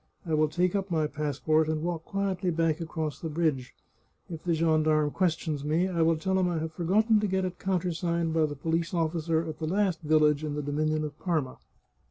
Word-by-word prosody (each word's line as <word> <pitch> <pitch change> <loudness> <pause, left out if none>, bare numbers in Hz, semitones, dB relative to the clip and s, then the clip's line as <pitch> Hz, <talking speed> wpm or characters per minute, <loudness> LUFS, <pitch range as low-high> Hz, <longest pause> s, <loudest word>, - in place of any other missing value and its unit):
" - - -37
I 160 - -2
will 155 0 +3
take 175 +4 0
up 195 0 -1
my 160 -3 +1
passport, 150 +1 0
and 155 0 -1
walk 170 -1 -3
quietly 195 -2 -1
back 165 -1 0
across 160 -2 -4
the 160 - -4
bridge. 150 -5 -1 0.6
If 160 -2 -7
the 170 -2 +1
gendarme 155 -2 +2
questions 165 -5 -1
me 160 +5 +1
I 175 -3 -1
will 165 0 +3
tell 190 +3 0
him 180 -1 +2
I 170 - -1
have 160 0 -4
forgotten 210 +6 +3
to 210 - 0
get 190 -1 0
it 180 -1 -5
countersigned 170 -3 -1
by 160 -1 +3
the 145 - -6
police 165 +5 -1
officer 165 0 0
at 155 -1 -6
the 160 - -2
last 190 0 0
village 150 -1 +3
in 150 -1 -3
the 150 - -3
dominion 155 +2 0
of 150 -1 -6
Parma." 155 -8 -2
160 Hz, 215 wpm, -28 LUFS, 155-175 Hz, 0.6 s, will